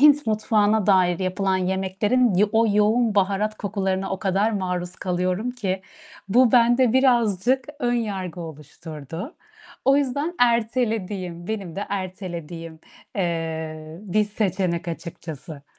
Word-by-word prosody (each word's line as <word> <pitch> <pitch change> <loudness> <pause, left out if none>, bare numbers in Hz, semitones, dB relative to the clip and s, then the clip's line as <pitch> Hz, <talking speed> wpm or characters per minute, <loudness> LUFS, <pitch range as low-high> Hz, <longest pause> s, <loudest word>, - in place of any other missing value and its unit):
Hint 295 0 +6
mutfağına 215 -1 +2
dair 185 -3 +4
yapılan 190 0 0
yemeklerin 190 +5 +1
ya 205 +3 +4
o 225 +1 +4
yoğun 215 +1 +3
baharat 200 +2 +1
kokularına 195 -2 -1
o 190 - -2
kadar 200 +2 +1
maruz 180 -2 -3
kalıyorum 185 +5 -1
ki, 195 -6 -3 0.5
bu 245 +3 +5
bende 240 0 +5
birazcık 250 -1 +3
önyargı 205 - -2
oluşturdu. 160 - -8 0.5
O 275 +1 +5
yüzden 285 +5 0
ertelediğim, 220 -7 0
benim 195 -6 -4
de 205 - -3
ertelediğim, 175 -4 -5 0.4
eee, 160 -3 -3
bir 210 +1 +1
seçenek 190 -4 -1
açıkçası. 160 -3 -7
195 Hz, 115 wpm, -23 LUFS, 180-225 Hz, 0.5 s, Hint